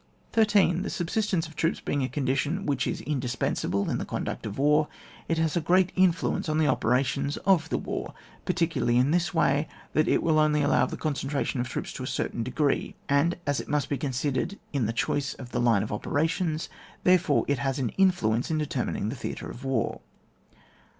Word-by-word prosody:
13. 205 -5 +4
The 200 - -3
subsistence 185 -1 -1
of 160 - -14
troops 165 +2 0
being 145 - -1
a 130 - -1
condition 140 +7 -1
which 135 -2 0
is - - -3
indispensable 125 -7 -1
in - - -1
the - - -2
con - - -3
duct - - -4
of 100 - -6
war, 150 +2 +3 0.4
it 165 - 0
has 160 0 +1
a 170 - +2
great 180 +3 +3
influence 185 -3 +2
on 155 - +1
the 160 - +3
operations 140 +3 +1
of 175 -5 +3
the - - 0
war, - - -5 0.3
particularly 160 -8 +1
in 130 +4 +3
this 175 0 +1
way, 150 -2 +2 0.3
that 155 - +3
it - - +2
will 155 -2 +3
only 150 -1 +3
allow 145 - +3
of - - +2
the - - -5
concentration 140 -3 -1
of 125 - -4
troops - - -4
to - - -7
a 130 - -4
certain 120 - -2
de 120 - -3
gree; 145 +1 0
and 140 +5 +2
as 145 -1 0
it - - -7
must 145 -2 0
be 140 - 0
considered 140 +6 -1 0.2
in 130 -6 +1
the - - 0
choice 135 +4 -1
of 125 -2 -10
the - - 0
line 115 -5 +3
of 105 - -5
operations, 160 - -1 0.4
therefore 180 -5 +4
it 140 -3 +1
has 135 0 -1
an 130 -4 0
influence 155 - +2
in 160 - 0
determining 145 -8 -2
the 125 - -4
theatre 125 - -5
of 125 - -10
war. 135 -5 -1
145 Hz, 205 wpm, -27 LUFS, 130-165 Hz, 0.4 s, 13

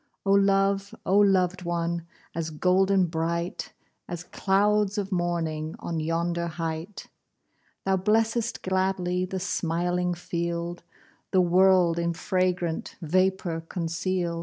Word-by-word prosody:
Oh 195 - +2
love! 195 0 +2
oh 195 +2 +4
loved 190 -2 +3
one! 170 -1 -2 0.3
As 165 -1 -3
golden 185 +4 +3
bright, 170 +1 -2 0.4
As 175 0 -5
clouds 205 +2 +1
of 200 -1 -2
morning 165 -3 -1
On 165 -1 -4
yonder 170 +2 -1
height! 165 +3 -5 0.8
Thou 190 0 +2
blessest 225 +4 +1
gladly 185 -1 0
The 190 +1 -4
smiling 175 0 -1
field, 170 0 -3 0.5
The 185 - +4
world 180 -1 +4
in 170 0 0
fragrant 180 -2 -1
Vapour 185 0 +1
conceal'd. 170 0 -2
180 Hz, 110 wpm, -26 LUFS, 170-190 Hz, 0.8 s, oh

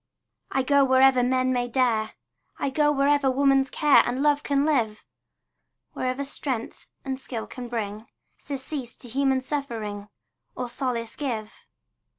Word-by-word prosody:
I 265 - 0
go 280 +1 +4
wherever 260 -1 +5
men 255 +1 +2
may 245 -1 0
dare, 235 -3 +1 0.4
I 275 - -1
go 295 +1 +3
wherever 285 -1 +3
woman's 270 0 +3
care 295 -2 +5
And 255 +3 -2
love 290 -1 +3
can 280 -1 +1
live, 230 -9 0 0.9
Wherever 255 +2 -2
strength 265 -4 -4 0.2
and 265 -1 -3
skill 235 -4 -5
can 250 -1 -8
bring 220 -2 -4 0.3
Surcease 265 -2 -6
to 245 - -13
human 265 +2 +1
suffering, 225 -8 -4 0.5
Or 250 -1 -4
solace 235 -3 -3
give. 225 -7 -5
260 Hz, 140 wpm, -25 LUFS, 235-275 Hz, 0.9 s, wherever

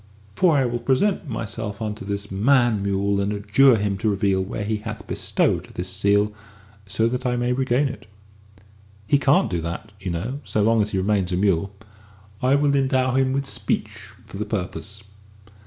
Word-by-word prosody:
For 175 - +3
I 135 - +3
will 120 0 -1
present 145 - +1
myself 110 -2 -4
unto 105 -2 -4
this 100 0 -4
man 120 +1 +3
mule 100 0 0
and 100 +1 -1
adjure 105 +6 +4
him 100 -2 -1
to 110 - +1
reveal 100 -1 +1
where 105 +2 -4
he 110 +1 -1
hath 105 - -7
bestowed - - 0
this 90 +1 -3
seal, 100 +2 +2 0.5
so 105 +3 +1
that 125 +2 -2
I 125 -2 0
may 120 0 0
regain 130 +2 +1
it." 125 -3 -8 1.0
"He 140 +6 +3
can't 140 -3 +3
do 85 -2 -1
that, 85 +6 -6
you 95 -1 -5
know, 105 +12 -3
so 105 - 0
long 115 +1 +3
as 105 - 0
he 95 - -2
remains 95 -1 +1
a - - +1
mule." 95 -1 +1 0.7
"I 130 +2 +3
will 145 0 +2
endow 130 -2 +2
him 130 0 +2
with 140 +1 -1
speech - - -2 0.3
for - - -10
the 105 - -2
purpose." 105 0 -5
105 Hz, 185 wpm, -23 LUFS, 100-130 Hz, 1.0 s, adjure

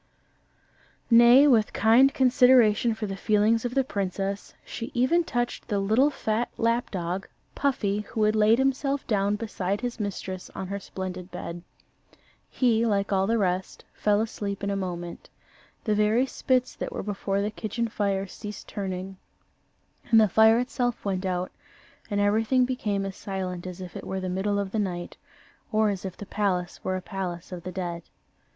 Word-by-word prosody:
Nay, 240 +4 +8
with 225 -6 +3
kind 240 +5 +5
consideration 250 -4 +4
for 220 - -4
the 195 -1 -4
feelings 215 +3 +2
of 245 +1 -3
the 270 - +3
princess, 195 -2 -3
she 230 0 -6
even 260 +8 +3
touched 240 -6 -3
the 205 - 0
little 220 +8 +3
fat 230 -4 -1
lap 230 +1 +1
dog, 180 0 -3 0.3
Puffy, 210 -8 0
who 215 +1 -2
had 215 +1 +3
laid 215 +1 +5
himself 270 +1 0
down 205 -2 +1
beside 205 -2 -3
his 245 -1 -4
mistress 190 -2 -5
on 190 - -4
her 200 0 -3
splendid 185 -2 -6
bed. 175 -1 -6 0.9
He, 230 -3 +2
like 200 -3 +1
all 190 0 +2
the 230 +1 +2
rest, 185 -2 -2
fell 205 -1 +2
fast 225 - -3
asleep 200 -1 -4
in 200 - 0
a - - -1
moment. 175 -3 -5 0.5
The 215 - +1
very 210 +4 +3
spits 255 -1 0
that - - -4
were - - -4
before 195 -1 -2
the 210 - -2
kitchen 230 +2 -3
fire 200 -3 -1
ceased 210 +2 -9
turning, 190 -1 -5 0.9
and 225 - +7
the 215 - +6
fire 220 +3 +5
itself 245 -1 -2
went 190 -1 -1
out, 180 0 -2 0.6
and 205 -2 0
everything 220 +5 +3
became 210 -6 -2
as 195 -1 -5
silent 185 -2 -5
as 180 0 -7
if 180 -2 -8
it - - -7
were 190 - -2
the 185 0 -3
middle 195 +3 0
of 200 -1 -2
the 220 - -1
night, 175 -4 -3 0.5
or 215 -1 +3
as 195 -1 -5
if 185 -1 -6
the 205 - -8
palace 190 -3 -2
were 185 - -1
a 185 - -4
palace 180 -4 -5
of 180 -1 -6
the 185 +2 -6
dead. 175 -2 -4
205 Hz, 175 wpm, -26 LUFS, 190-230 Hz, 0.9 s, Nay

